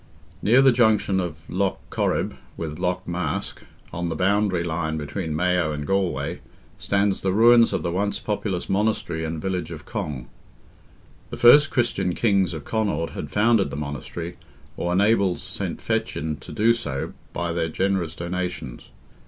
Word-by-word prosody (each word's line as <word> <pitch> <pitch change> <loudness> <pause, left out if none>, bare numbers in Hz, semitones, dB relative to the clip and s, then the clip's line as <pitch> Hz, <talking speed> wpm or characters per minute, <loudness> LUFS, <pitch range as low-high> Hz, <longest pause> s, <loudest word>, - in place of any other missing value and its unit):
Near 125 +5 +5
the 135 - +7
junction 110 -5 +3
of 85 -2 -5
Lough 95 +1 0
Corrib - - 0 0.2
with 80 -1 -5
Lough 90 0 -1
Mask, 85 -3 -3 0.3
on 85 +1 -2
the 80 - -2
boundary 95 -1 +2
line 80 -2 -2
between 75 +2 -4
Mayo 90 -1 +1
and 75 -1 -4
Galway, 90 -4 -1 0.4
stands 100 0 +1
the 95 - +1
ruins 115 +3 +6
of - - -1
the 85 - -1
once 100 +3 0
populous 105 -4 -3
monastery 100 -5 0
and 80 0 -3
village 90 +1 -2
of 75 -3 -8
Cong. 75 - -4 1.0
The - - -6
first 140 +5 +7
Christian 100 -8 0
kings 100 -6 +2
of 75 - -7
Connaught 100 -8 -1
had - - -6
founded 110 -1 +3
the - - -6
monastery, 75 +4 -5 0.4
or 85 - -2
enabled 100 -1 +3
St. - - -5
Fechin 75 0 -2
to 70 - -11
do 115 +2 +3
so 70 - -4 0.2
by 85 0 -2
their 85 -1 -1
generous 95 -2 -1
donations. 85 -7 -5
90 Hz, 155 wpm, -24 LUFS, 80-100 Hz, 1.0 s, the